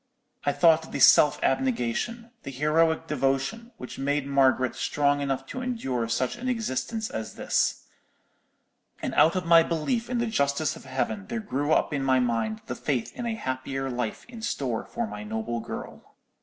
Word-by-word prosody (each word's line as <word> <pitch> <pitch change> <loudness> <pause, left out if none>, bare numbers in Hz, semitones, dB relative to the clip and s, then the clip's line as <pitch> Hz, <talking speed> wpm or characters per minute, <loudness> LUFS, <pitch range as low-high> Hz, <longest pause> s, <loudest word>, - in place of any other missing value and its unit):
I - - +5
thought 160 +1 +4
of - - -14
the - - -2
self 150 - +7
abnegation, 230 - -1
the - - -7
heroic 160 +4 +2
devotion, 145 - -1
which 125 - -8
made 145 +1 0
Margaret 135 -2 +3
strong 145 0 +1
enough 135 -1 -2
to 255 - -6
endure 135 - -2
such 120 +2 -1
an 255 +1 -3
existence 220 - -2
as 110 -1 -5
this: - - 0 1.1
and - - -3
out 165 +3 +5
of 185 -1 -1
my 165 0 +7
belief 170 +10 -1
in 250 - -1
the 235 - +1
justice 145 -8 0
of - - -13
Heaven 165 +10 -2
there 235 +1 -3
grew 145 -7 -2
up 155 - +2
in 140 - -1
my 130 -1 +3
mind 115 -3 -1
the - - -4
faith 125 -2 -2
in 240 - -4
a 225 - -1
happier 135 -5 -3
life 120 -3 -3
in 235 -2 -10
store 135 - -2
for - - -3
my 105 0 -7
noble 110 +2 -3
girl. - - -8
140 Hz, 180 wpm, -27 LUFS, 130-210 Hz, 1.1 s, self